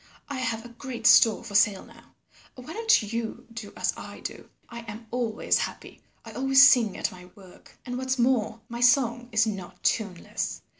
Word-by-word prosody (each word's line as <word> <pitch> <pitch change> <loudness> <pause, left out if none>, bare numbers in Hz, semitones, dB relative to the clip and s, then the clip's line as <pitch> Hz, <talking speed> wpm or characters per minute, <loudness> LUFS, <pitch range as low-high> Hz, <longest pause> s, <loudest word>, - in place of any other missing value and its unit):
I 280 - -4
have 230 -2 -3
a - - -10
great 235 -1 -8
store 225 -1 +6
for 220 -3 -10
sale 200 -1 +3
now. - - -19 0.4
Why 255 +5 -10
don't 445 - +3
you 230 -1 -4
do 220 -3 -8
as - - 0
I - - -10
do? - - -8 0.2
I 235 - -9
am 220 +1 -8
always 235 -3 0
happy. - - -6 0.2
I 225 - -9
always 270 +4 +6
sing 230 -7 +3
at - - -2
my 180 -1 -13
work, 190 -3 -17
and 245 0 -4
what's 260 0 -1
more, 235 -3 +1
my 235 0 -7
song 245 -1 +3
is 220 0 +3
not 195 -5 -6
tuneless. 200 -6 -2
235 Hz, 185 wpm, -26 LUFS, 220-250 Hz, 0.4 s, store